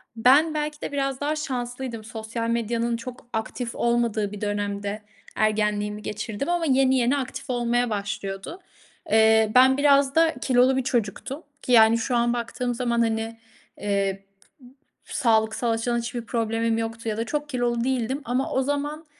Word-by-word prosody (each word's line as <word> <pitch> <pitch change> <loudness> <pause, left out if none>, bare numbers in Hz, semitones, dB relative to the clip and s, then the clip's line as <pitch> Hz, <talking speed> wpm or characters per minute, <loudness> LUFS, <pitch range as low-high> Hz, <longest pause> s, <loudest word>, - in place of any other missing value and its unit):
Ben 280 +8 +5
belki 300 0 -3
de - - -4
biraz 275 -1 -2
daha 300 +2 0
şanslıydım. 245 -5 -4
Sosyal 230 +1 -4
medyanın 235 0 0
çok 245 0 -9
aktif 230 +2 -4
olmadığı 235 -3 0
bir 210 - -8
dönemde 205 0 -2 0.3
ergenliğimi 210 -1 0
geçirdim 215 - -4
ama 345 -1 +1
yeni 265 -1 +3
yeni 250 +3 +2
aktif 260 -1 -5
olmaya 240 0 +1
başlıyordu. 200 - -4 0.5
Eee, 220 0 +5
ben 260 +1 +6
biraz 280 -1 +4
da 325 -1 +4
kilolu 260 0 +3
bir 260 - 0
çocuktum 245 - -2 0.2
ki 250 - -4
yani 225 -1 +7
şu 240 +2 -1
an 235 0 +2
baktığım 245 +1 -2
zaman, 235 -1 0
hani, 225 0 -1 0.4
eee, 195 -1 -1 0.8
p - - -11
sağlıksal 220 0 +2
açıdan 235 +1 0
hiçbir 240 +1 -4
problemim 225 -1 0
yoktu 225 0 -3
ya 215 - -2
da 230 - 0
çok 295 +3 -3
kilolu 240 -2 0
değildim 260 +2 -1
ama 250 +3 -1
o 265 - +1
zaman 290 +3 -3
235 Hz, 155 wpm, -24 LUFS, 220-265 Hz, 0.8 s, yani